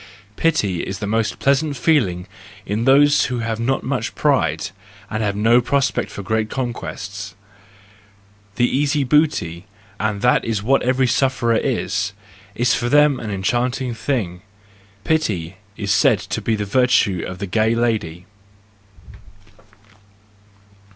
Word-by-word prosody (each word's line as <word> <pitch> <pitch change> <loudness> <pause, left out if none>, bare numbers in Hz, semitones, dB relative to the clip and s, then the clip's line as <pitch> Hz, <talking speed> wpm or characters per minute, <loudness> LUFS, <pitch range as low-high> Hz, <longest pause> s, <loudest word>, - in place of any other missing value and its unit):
—Pity 105 - +1
is 95 - -5
the 105 - -4
most 110 +1 -1
pleasant 140 +1 +1
feeling 115 - +1 0.4
in 110 +3 -2
those 145 +2 +5
who 125 -2 -2
have 115 0 -3
not 130 +3 0
much 130 -3 -3
pride, 90 - +1 0.4
and 110 0 -2
have 100 -2 -1
no 115 +4 +4
prospect 135 +2 -1
of 100 - -6
great 110 +1 0
conquests: 100 -6 -5 1.2
the 120 - +3
easy 145 +2 +1
booty—and 105 - -1
that 125 - +3
is 110 -3 -2
what 135 +5 +3
every 130 +1 +2
sufferer 125 -2 +1
is—Is 120 +1 -2
for 120 0 -1
them 145 -1 +4
an 110 - -5
enchanting 120 +6 -1
thing. 110 -9 -3 0.6
Pity 95 - -1 0.2
is 100 -2 -2
said 125 +1 +4
to 95 +4 -5
be 110 +1 0
the 105 -1 -3
virtue 100 -6 +2
of 90 - -7
the 100 - -4
gay 110 +4 +1
lady. 105 -8 -1
115 Hz, 130 wpm, -20 LUFS, 100-130 Hz, 1.2 s, those